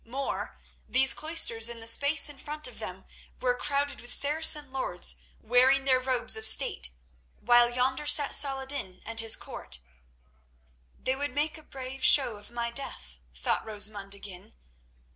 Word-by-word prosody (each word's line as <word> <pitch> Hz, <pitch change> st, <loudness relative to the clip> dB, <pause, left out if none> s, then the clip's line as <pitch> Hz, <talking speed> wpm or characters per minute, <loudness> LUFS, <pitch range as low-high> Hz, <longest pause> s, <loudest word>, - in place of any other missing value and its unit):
More; 270 Hz, +4 st, -5 dB, 0.3 s
these 265 Hz, +1 st, +4 dB
cloisters 235 Hz, -8 st, +1 dB
and 235 Hz, -1 st, -8 dB
the 225 Hz, -, -11 dB
space 285 Hz, +8 st, +3 dB
in 290 Hz, -2 st, -8 dB
front 300 Hz, +2 st, -4 dB
of -, -, -11 dB
them -, -, -8 dB, 0.3 s
were 250 Hz, -1 st, +1 dB
crowded 285 Hz, +2 st, -2 dB
with 240 Hz, -, -4 dB
Saracen 295 Hz, 0 st, +3 dB
lords, 260 Hz, -9 st, +1 dB, 0.2 s
wearing 255 Hz, +4 st, +3 dB
their 260 Hz, -1 st, +3 dB
robes 255 Hz, -3 st, 0 dB
of 220 Hz, -, -7 dB
state, 65 Hz, -, +2 dB, 0.5 s
while 240 Hz, +1 st, +4 dB
yonder 260 Hz, +4 st, -1 dB
sat 290 Hz, -1 st, +4 dB
Saladin 270 Hz, -8 st, +1 dB
and 225 Hz, 0 st, 0 dB
his 225 Hz, -1 st, +4 dB
court. 60 Hz, -, -7 dB, 1.2 s
"They 260 Hz, -, -2 dB
would 280 Hz, -1 st, -5 dB
make 305 Hz, +2 st, -2 dB
a -, -, -15 dB
brave 265 Hz, -2 st, -9 dB
show 250 Hz, -7 st, +5 dB
of 205 Hz, -, -14 dB
my 235 Hz, 0 st, -4 dB
death," 65 Hz, -, -7 dB, 0.2 s
thought -, -, -2 dB
Rosamund 205 Hz, -2 st, -1 dB
again. 190 Hz, -, -11 dB
255 Hz, 155 wpm, -28 LUFS, 225-280 Hz, 1.2 s, show